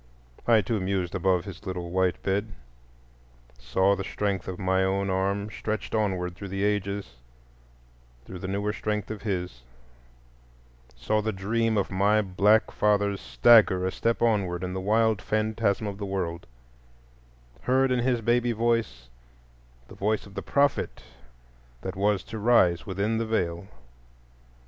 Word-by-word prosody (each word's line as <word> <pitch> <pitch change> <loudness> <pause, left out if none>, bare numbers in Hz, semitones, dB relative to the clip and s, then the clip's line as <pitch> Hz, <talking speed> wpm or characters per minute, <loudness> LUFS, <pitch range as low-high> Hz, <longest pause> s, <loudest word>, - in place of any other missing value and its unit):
I 115 -2 +6
too 105 +3 -1
mused 95 -2 -2
above 95 -1 +1
his 95 -3 -9
little 90 -2 -4
white 95 -1 0
bed; 100 +2 -1 1.0
saw 95 +12 +2
the 95 - -4
strength 100 -1 -2
of 95 - -5
my 95 0 +1
own 95 +1 0
arm 100 +2 -1
stretched 110 +1 -4
onward 95 -5 0
through 100 +2 -8
the 95 +1 -3
ages 100 -9 -2 1.1
through 90 - -8
the 95 - -5
newer 100 +2 -1
strength 105 -1 -3
of 105 -2 -6
his; 90 - -3 1.3
saw 65 - 0
the 110 +1 -1
dream 110 +3 0
of 100 - -1
my 100 +3 +3
black 100 +3 +3
fathers 100 -1 +1
stagger 90 - +5
a 95 - 0
step 115 +3 -1
onward 95 -6 +1
in 90 0 -3
the 95 - -3
wild 110 +1 +2
phantasm 110 -1 0
of 100 -1 -5
the 100 - -3
world; 85 -6 -3 1.1
heard 130 +1 +2
in 125 - +2
his 120 -1 +1
baby 120 +1 +2
voice 115 - -1 0.8
the - - -13
voice 105 +2 -1
of 100 - -14
the 100 - -4
Prophet 140 +4 0 0.8
that 95 0 -5
was 100 0 +1
to 110 - -7
rise 100 -7 +3
within 105 +4 -1
the 115 - -1
Veil. 90 -4 -1
100 Hz, 150 wpm, -26 LUFS, 95-110 Hz, 1.3 s, I